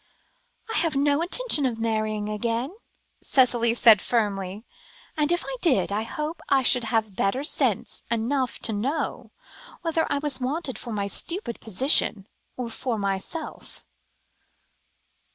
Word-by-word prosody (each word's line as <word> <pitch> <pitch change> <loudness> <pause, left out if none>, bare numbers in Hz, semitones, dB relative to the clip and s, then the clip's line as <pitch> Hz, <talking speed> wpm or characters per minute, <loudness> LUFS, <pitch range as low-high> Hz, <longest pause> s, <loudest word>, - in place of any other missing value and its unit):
"I - - +1
have 330 -4 +1
no 285 +2 +2
intention 360 - +2
of 235 -3 -3
marrying 215 -2 -1
again," 230 - -2 0.5
Cicely 240 -3 +3
said 225 -4 +7
firmly, 205 -2 -1 0.5
"and, 300 0 +1
if 345 - +1
I - - -4
did, 285 - +2
I 205 +2 0
hope 300 +8 -5
I 270 -1 +4
should 250 -1 +4
have 220 -3 -1 0.3
sense - - 0
enough 245 +3 0
to 225 - +1
know 265 +10 -2 0.5
whether 330 -1 0
I 285 - +2
was 280 -3 -2
wanted 265 -2 -2
for 235 - -7
my 205 -2 -1
stupid 285 - -3
position, 220 - +2 0.3
or 245 -2 -4
for 235 0 -3
myself." 200 - -5
240 Hz, 135 wpm, -25 LUFS, 215-295 Hz, 0.5 s, said